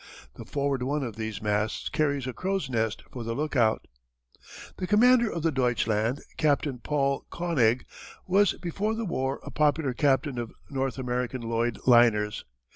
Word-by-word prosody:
The -, -, -10 dB
forward 140 Hz, -2 st, -1 dB
one 140 Hz, +3 st, -1 dB
of 115 Hz, -5 st, -5 dB
these 110 Hz, -2 st, -5 dB
masts 105 Hz, +1 st, -1 dB
carries 140 Hz, -4 st, 0 dB
a 130 Hz, -, -4 dB
crow's 190 Hz, -5 st, -2 dB
nest 110 Hz, -2 st, -1 dB
for 120 Hz, -, -6 dB
the 115 Hz, 0 st, -3 dB
lookout. 125 Hz, -7 st, +1 dB, 0.9 s
The 185 Hz, -, -3 dB
commander 235 Hz, +2 st, +5 dB
of 170 Hz, -, -4 dB
the 165 Hz, -, +2 dB
Deutschland, 120 Hz, -2 st, 0 dB, 0.2 s
Captain 145 Hz, -4 st, +1 dB
Paul 140 Hz, +1 st, -1 dB
König, 130 Hz, -9 st, +1 dB, 0.4 s
was 195 Hz, +1 st, +3 dB
before 200 Hz, +5 st, -2 dB
the 225 Hz, 0 st, -3 dB
war 135 Hz, -6 st, -2 dB
a -, -, -8 dB
popular 145 Hz, -2 st, +1 dB
captain 135 Hz, -1 st, +1 dB
of 115 Hz, -1 st, -5 dB, 0.2 s
North 135 Hz, -2 st, -1 dB
German 125 Hz, -1 st, -2 dB
Lloyd 115 Hz, 0 st, -1 dB
liners. 115 Hz, -4 st, +4 dB
135 Hz, 155 wpm, -27 LUFS, 115-155 Hz, 0.9 s, commander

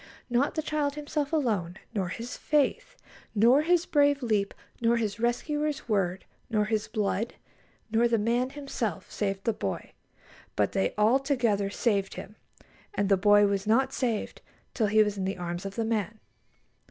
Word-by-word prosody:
Not 250 Hz, +4 st, +2 dB
the 315 Hz, -, -1 dB
child 295 Hz, -2 st, -1 dB
himself 295 Hz, -1 st, -3 dB
alone, 210 Hz, -, 0 dB, 0.2 s
nor 190 Hz, -4 st, -1 dB
his 230 Hz, +6 st, -6 dB
faith, 465 Hz, -, 0 dB, 0.4 s
nor 235 Hz, +7 st, +5 dB
his 350 Hz, +2 st, +2 dB
brave 285 Hz, -4 st, +3 dB
leap, 210 Hz, -4 st, +1 dB, 0.3 s
nor 235 Hz, 0 st, +3 dB
his 215 Hz, -2 st, -2 dB
rescuer's 295 Hz, +5 st, -1 dB
word, 190 Hz, -4 st, 0 dB, 0.2 s
nor 210 Hz, -2 st, +1 dB
his 215 Hz, -1 st, -1 dB
blood, 215 Hz, +1 st, -1 dB, 0.6 s
nor 230 Hz, +2 st, +4 dB
the 235 Hz, -1 st, +2 dB
man 235 Hz, +4 st, +1 dB
himself 270 Hz, -, -4 dB
saved 195 Hz, -2 st, -2 dB
the 230 Hz, -, +1 dB
boy, -, -, -4 dB, 0.6 s
but -, -, +1 dB
they 195 Hz, -, 0 dB
all 220 Hz, +5 st, +4 dB
together 235 Hz, -8 st, +1 dB
saved 200 Hz, -2 st, 0 dB
him; 210 Hz, -, -9 dB, 0.6 s
and 200 Hz, -, 0 dB
the 195 Hz, -, +6 dB
boy 205 Hz, +2 st, +5 dB
was 200 Hz, 0 st, -1 dB
not 265 Hz, +5 st, +3 dB
saved 235 Hz, -5 st, -2 dB, 0.3 s
till 220 Hz, -4 st, +1 dB
he 215 Hz, +1 st, +5 dB
was 205 Hz, -1 st, -3 dB
in 190 Hz, -, -1 dB
the 195 Hz, 0 st, -2 dB
arms 175 Hz, +2 st, -4 dB
of 195 Hz, -, -8 dB
the 230 Hz, -, -1 dB
man. 220 Hz, -1 st, -2 dB
225 Hz, 165 wpm, -28 LUFS, 200-270 Hz, 0.6 s, the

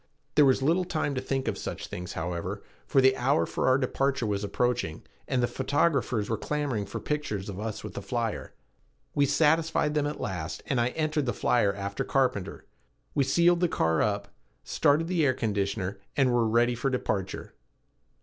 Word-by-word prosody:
There 150 Hz, -, +6 dB
was 130 Hz, 0 st, +3 dB
little 170 Hz, +6 st, +3 dB
time 155 Hz, -5 st, -1 dB
to 130 Hz, -, -2 dB
think 135 Hz, 0 st, -2 dB
of -, -, -1 dB
such -, -, -5 dB
things, 90 Hz, 0 st, -6 dB
however, 85 Hz, +1 st, -4 dB, 0.2 s
for 135 Hz, -, +4 dB
the 130 Hz, 0 st, +5 dB
hour 135 Hz, +5 st, +2 dB
for -, -, -1 dB
our 130 Hz, 0 st, +5 dB
departure 135 Hz, -1 st, 0 dB
was 105 Hz, -1 st, -1 dB
approaching, 120 Hz, -5 st, -1 dB, 0.2 s
and 125 Hz, -1 st, +1 dB
the -, -, +3 dB
photographers 135 Hz, -5 st, +1 dB
were 110 Hz, -1 st, -2 dB
clamoring 140 Hz, -9 st, -2 dB
for -, -, -5 dB
pictures 110 Hz, -10 st, -3 dB
of 100 Hz, -1 st, -6 dB
us 110 Hz, -1 st, -4 dB
and -, -, -7 dB
the -, -, -5 dB
flyer. -, -, -3 dB, 0.6 s
We 140 Hz, -1 st, +3 dB
satisfied 155 Hz, +1 st, +2 dB
them 150 Hz, -1 st, +1 dB
at 150 Hz, -, -5 dB
last, 80 Hz, -5 st, -4 dB
and 130 Hz, -4 st, +1 dB
I 120 Hz, -, +2 dB
entered 155 Hz, -3 st, 0 dB
the 120 Hz, -, +1 dB
flyer 115 Hz, -5 st, +2 dB
after 100 Hz, 0 st, -3 dB
Carpenter. 125 Hz, -8 st, -1 dB, 0.5 s
We 140 Hz, -, +2 dB
sealed 170 Hz, +6 st, +4 dB
the 175 Hz, -, +3 dB
car 80 Hz, -, +1 dB
up, 100 Hz, -1 st, -1 dB, 0.3 s
started 150 Hz, +3 st, +2 dB
the 175 Hz, -3 st, +1 dB
air 130 Hz, -3 st, +3 dB
conditioner, 100 Hz, -3 st, -2 dB, 0.2 s
and 130 Hz, -3 st, +3 dB
were 120 Hz, -2 st, +3 dB
ready 120 Hz, +2 st, +3 dB
for 120 Hz, +3 st, -1 dB
departure. 100 Hz, -7 st, -3 dB
130 Hz, 185 wpm, -28 LUFS, 105-145 Hz, 0.6 s, There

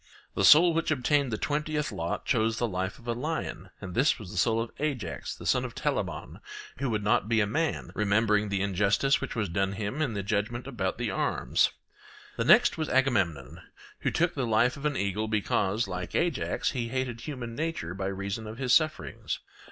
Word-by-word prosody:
The 100 Hz, -, -1 dB
soul 165 Hz, -, +8 dB
which 165 Hz, 0 st, 0 dB
obtained 140 Hz, -2 st, +2 dB
the 110 Hz, -, -1 dB
twentieth 150 Hz, 0 st, -1 dB
lot 85 Hz, -4 st, -3 dB
chose 110 Hz, -2 st, +1 dB
the 120 Hz, -, 0 dB
life 95 Hz, 0 st, -3 dB
of 120 Hz, -, -16 dB
a 120 Hz, -, +1 dB
lion, 130 Hz, -, -4 dB
and 95 Hz, -3 st, -7 dB
this 135 Hz, -, +3 dB
was 90 Hz, -, -9 dB
the -, -, -7 dB
soul 115 Hz, -1 st, +2 dB
of 115 Hz, 0 st, -3 dB
Ajax 130 Hz, -, -3 dB
the -, -, -11 dB
son -, -, +2 dB
of -, -, -6 dB
Telamon, -, -, -3 dB, 0.4 s
who 135 Hz, -1 st, -1 dB
would 105 Hz, -2 st, -1 dB
not 105 Hz, 0 st, +2 dB
be 115 Hz, -1 st, +3 dB
a 105 Hz, -, +3 dB
man, 155 Hz, +10 st, -1 dB
remembering 105 Hz, 0 st, +2 dB
the 100 Hz, -1 st, 0 dB
injustice 100 Hz, +7 st, +2 dB
which -, -, -4 dB
was 110 Hz, -4 st, 0 dB
done 95 Hz, +3 st, 0 dB
him 105 Hz, +8 st, -3 dB
in 130 Hz, -8 st, 0 dB
the 100 Hz, -, -2 dB
judgment 105 Hz, +4 st, -2 dB
about 105 Hz, -9 st, -2 dB
the 120 Hz, -4 st, -2 dB
arms. -, -, +1 dB, 0.7 s
The -, -, -1 dB
next -, -, +5 dB
was 155 Hz, -, -1 dB
Agamemnon, 90 Hz, -, +1 dB, 0.4 s
who -, -, 0 dB
took 170 Hz, +1 st, +1 dB
the 130 Hz, -4 st, -2 dB
life 115 Hz, +3 st, +3 dB
of 150 Hz, +1 st, -2 dB
an 145 Hz, -, -2 dB
eagle, 100 Hz, +2 st, -1 dB
because, 105 Hz, 0 st, 0 dB
like 90 Hz, -2 st, -5 dB
Ajax, 170 Hz, -6 st, 0 dB
he 120 Hz, -4 st, -2 dB
hated 125 Hz, -1 st, -3 dB
human 120 Hz, -4 st, -6 dB
nature 155 Hz, -, -3 dB
by 95 Hz, +1 st, -3 dB
reason 100 Hz, +3 st, -4 dB
of 110 Hz, +1 st, -7 dB
his 125 Hz, -2 st, +1 dB
sufferings. 155 Hz, -1 st, +1 dB
115 Hz, 200 wpm, -28 LUFS, 100-135 Hz, 0.7 s, soul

